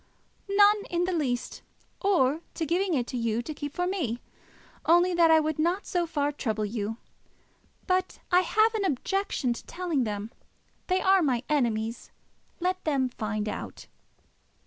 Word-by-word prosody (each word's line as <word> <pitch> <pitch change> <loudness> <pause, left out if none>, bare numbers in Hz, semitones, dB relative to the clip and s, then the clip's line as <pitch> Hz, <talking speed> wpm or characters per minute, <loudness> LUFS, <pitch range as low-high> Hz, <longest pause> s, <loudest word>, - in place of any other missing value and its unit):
"None 410 +1 +5
in 345 0 0
the 365 +1 0
least: 255 -7 -2 0.4
or 325 -7 +2
to 325 - -1
giving 355 +2 +1
it 245 -2 -2
you 230 -1 -1
to 310 - -5
keep 290 -1 -5
for 355 - 0
me, 320 - -2 0.7
only 350 +2 +5
that 340 -1 +5
I 320 0 +7
would 310 -1 -2
not 350 +5 +1
so 350 -2 -1
far 290 -3 0
trouble 220 -7 -2
you. 215 +1 -3 0.9
But 370 0 0
I 360 - +6
have 435 +5 +3
an 435 -2 -1
objection 340 -4 0
to - - -9
telling 340 -7 -1
them. 210 0 -4 0.6
They 370 0 +1
are 385 0 +5
my 255 -6 +1
enemies. 230 -5 0 0.5
Let 370 +1 -1
them 275 -4 +1
find 215 -2 -3
out." - - -6
315 Hz, 155 wpm, -27 LUFS, 240-365 Hz, 0.9 s, I